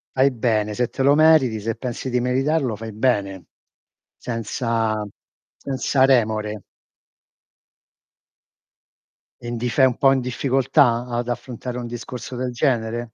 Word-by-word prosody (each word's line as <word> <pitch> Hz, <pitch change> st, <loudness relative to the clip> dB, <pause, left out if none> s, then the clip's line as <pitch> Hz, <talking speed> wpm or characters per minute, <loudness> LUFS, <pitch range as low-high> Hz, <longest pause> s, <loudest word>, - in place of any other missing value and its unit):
Fai 135 Hz, +1 st, +4 dB
bene, 110 Hz, -4 st, -1 dB
se 125 Hz, +1 st, 0 dB
te -, -, -5 dB
lo 140 Hz, +2 st, +5 dB
meriti, 155 Hz, -8 st, +4 dB
se 115 Hz, +2 st, -2 dB
pensi 125 Hz, +1 st, -5 dB
di 125 Hz, -, +1 dB
meritarlo 130 Hz, 0 st, 0 dB
fai 110 Hz, +1 st, -7 dB
bene, 100 Hz, -5 st, -1 dB, 0.7 s
senza 115 Hz, -2 st, -2 dB, 0.5 s
senza 135 Hz, 0 st, +1 dB
remore. 110 Hz, -5 st, +1 dB, 2.8 s
E 120 Hz, -, -8 dB
n -, -, -3 dB
di 125 Hz, +2 st, -2 dB
sei 130 Hz, +2 st, +4 dB
un 125 Hz, -, -2 dB
po' 135 Hz, -, +4 dB
in 135 Hz, -, +2 dB
difficoltà, 125 Hz, -1 st, +1 dB
ad 120 Hz, 0 st, -3 dB
affrontare 125 Hz, 0 st, -5 dB
un 120 Hz, -, -5 dB
discorso 120 Hz, +1 st, -7 dB
del 125 Hz, 0 st, -3 dB
genere? 120 Hz, -3 st, -1 dB
120 Hz, 135 wpm, -22 LUFS, 115-130 Hz, 2.8 s, lo